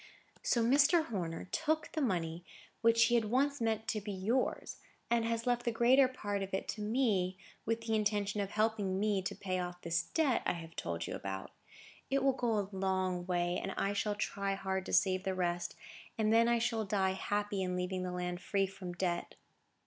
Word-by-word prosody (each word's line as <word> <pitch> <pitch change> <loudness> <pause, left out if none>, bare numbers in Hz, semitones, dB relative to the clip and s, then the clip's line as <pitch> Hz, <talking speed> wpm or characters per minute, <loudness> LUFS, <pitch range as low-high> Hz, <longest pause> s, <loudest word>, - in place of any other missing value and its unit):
"So 235 - +2
Mr. 285 +7 +5
Horner 175 -7 -4
took 315 -2 0
the 315 - -2
money 170 - -1 0.4
which 230 0 +5
he 235 +1 +4
once 260 +5 +1
meant 220 -1 0
to 215 - -1
be 205 +1 -5
yours, 210 +7 -1 0.3
and 235 -1 +3
has 230 0 -1
left 245 -1 +1
the 235 - +1
greater 250 +4 +5
part 205 -6 -3
of 195 0 -2
it - - -3
to 215 - -3
me, 210 -5 +1 0.3
with 230 0 0
the 225 -1 -2
intention 210 -1 +1
of 200 - -2
helping 210 -3 0
me 205 -2 +1
to 190 - -4
pay 185 -2 -2
off 175 0 -4
this 170 0 +1
debt 295 -7 +1
I - - +1
have 165 -1 -9
told 85 -1 -3
you - - -5
about. 95 -1 -5 0.6
It 275 0 +1
will 270 -1 +4
go 240 -4 0
a 200 -1 -1
long 185 -2 0
way, 175 0 0
and 195 - -3
I 200 - 0
shall 205 +1 0
try 200 -1 -1
hard 190 -1 -2
to - - -4
save 185 -2 +3
the 190 -1 -1
rest, 175 -1 -1 0.4
and 220 0 +2
then 230 +1 +5
I 235 0 +4
shall 230 -1 0
die 195 -2 +1
happy 205 +1 -1
in 180 -1 -1
leaving 180 +1 -2
the 180 0 -3
land 180 0 -3
free 195 -1 +1
from 185 -2 -7
debt." 175 -1 -2
205 Hz, 200 wpm, -33 LUFS, 185-230 Hz, 0.6 s, Mr